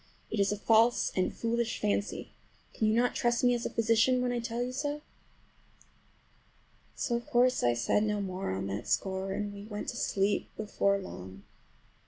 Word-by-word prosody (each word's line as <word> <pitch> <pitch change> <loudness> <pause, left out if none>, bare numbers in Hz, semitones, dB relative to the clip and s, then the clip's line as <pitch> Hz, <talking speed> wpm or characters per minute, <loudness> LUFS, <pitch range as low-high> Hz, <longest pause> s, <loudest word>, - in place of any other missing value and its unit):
It 220 - -1
is 200 0 +3
a 210 - -1
false 225 +3 +4
and 185 - +1
foolish 235 0 -1
fancy. 205 -1 -1 0.4
Can 220 - +1
you 215 - +3
not 245 +1 +2
trust 240 0 +1
me 245 0 +5
as 240 0 -1
a - - -5
physician 230 +3 +3
when 250 0 0
I 245 - -1
tell 235 +1 -2
you 250 - -3
so?" 290 +3 -3 1.9
So 240 - -1
of 235 0 -4
course 250 +1 +3
I 120 -1 +3
said 120 - +2
no 210 -1 0
more 190 -1 -3
on 95 +1 -2
that 100 +1 -4
score, 190 0 -1
and 205 +1 -3
we 200 0 -9
went 210 -1 -5
to - - -5
sleep 200 +1 0
before 200 -2 +1
long. 95 - -9
215 Hz, 185 wpm, -30 LUFS, 195-240 Hz, 1.9 s, me